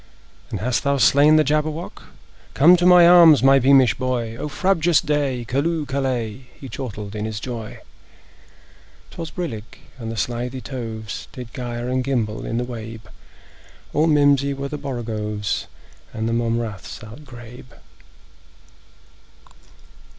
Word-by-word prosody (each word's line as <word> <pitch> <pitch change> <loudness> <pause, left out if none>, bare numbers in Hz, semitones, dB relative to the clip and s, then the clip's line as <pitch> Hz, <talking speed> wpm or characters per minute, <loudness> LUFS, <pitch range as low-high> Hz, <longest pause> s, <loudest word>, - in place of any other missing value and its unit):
"And - - -4
hast 125 +2 -1
thou 140 0 +1
slain 145 +3 +5
the 155 - +5
Jabberwock? 155 +3 -2 0.5
Come 165 +6 +7
to 175 0 +2
my 180 -1 +8
arms, 165 -7 +7
my 135 0 +6
beamish 135 -1 +5
boy! 125 -3 -3
O 150 +5 -5
frabjous 175 0 +2
day! 140 -5 -1
Callooh! 150 +4 -1
Callay!" 130 -3 -3
He 135 - -9
chortled 105 -4 -7
in 105 0 -3
his 110 -1 -4
joy. 115 -2 -7 1.3
'Twas 165 -1 -7
brillig, 120 - -6 0.2
and 115 -1 -5
the 115 - -6
slithy 120 +5 -3
toves 115 -4 -6
Did 125 -2 -9
gyre 120 -1 -5
and 130 0 -1
gimble 115 -5 -2
in 115 - -2
the 120 - -1
wabe; 115 -2 -8 0.9
All 155 +2 +2
mimsy 140 -2 +3
were 140 0 -5
the 150 - -5
borogoves, 110 -6 -4 0.5
And 110 0 -2
the 115 - -1
mome 115 0 0
raths 110 -5 -6
outgrabe. 120 0 -12
125 Hz, 135 wpm, -21 LUFS, 115-145 Hz, 1.3 s, my